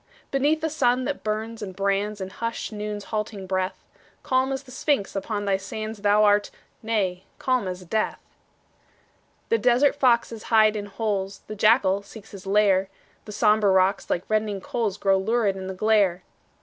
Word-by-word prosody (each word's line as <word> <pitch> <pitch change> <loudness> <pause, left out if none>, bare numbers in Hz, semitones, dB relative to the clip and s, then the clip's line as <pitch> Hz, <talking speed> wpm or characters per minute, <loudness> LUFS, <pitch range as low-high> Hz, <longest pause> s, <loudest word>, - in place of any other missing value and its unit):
Beneath 290 +4 +2
the 320 - 0
sun 255 -4 +1
that 285 - -3
burns 220 +1 -3
and 190 -3 -6
brands 200 +2 -1
In 190 0 -5
hushed 230 +2 -4
Noon's 210 -1 -5
halting 210 -2 -3
breath, 185 0 -2 0.4
Calm 260 +1 +1
as 270 +1 -3
the 260 - -15
Sphinx 265 -6 -1
upon 205 +1 -3
thy 195 -1 +2
sands 215 +2 -6
Thou 205 +1 +4
art 205 0 +3 0.3
nay, 195 -5 -1
calm 255 -6 0
as 180 0 -6
death. 215 +5 -1 1.3
The 460 - +2
desert 250 +4 +3
foxes 235 -4 +2
hide 220 -1 +5
in 205 -1 -4
holes, 200 -1 -3
The 215 - -7
jackal 200 -2 +3
seeks 205 +1 -13
his 195 -1 -10
lair; 195 -1 +3 0.4
The 210 - -8
sombre 210 -1 +3
rocks, 190 +1 +2
like 175 - 0
reddening 215 -2 0
coals, 210 -1 -2
Glow 195 -2 +2
lurid 215 0 +1
in 190 -1 -6
the 190 - -5
glare. 200 -3 +2
210 Hz, 170 wpm, -24 LUFS, 195-230 Hz, 1.3 s, hide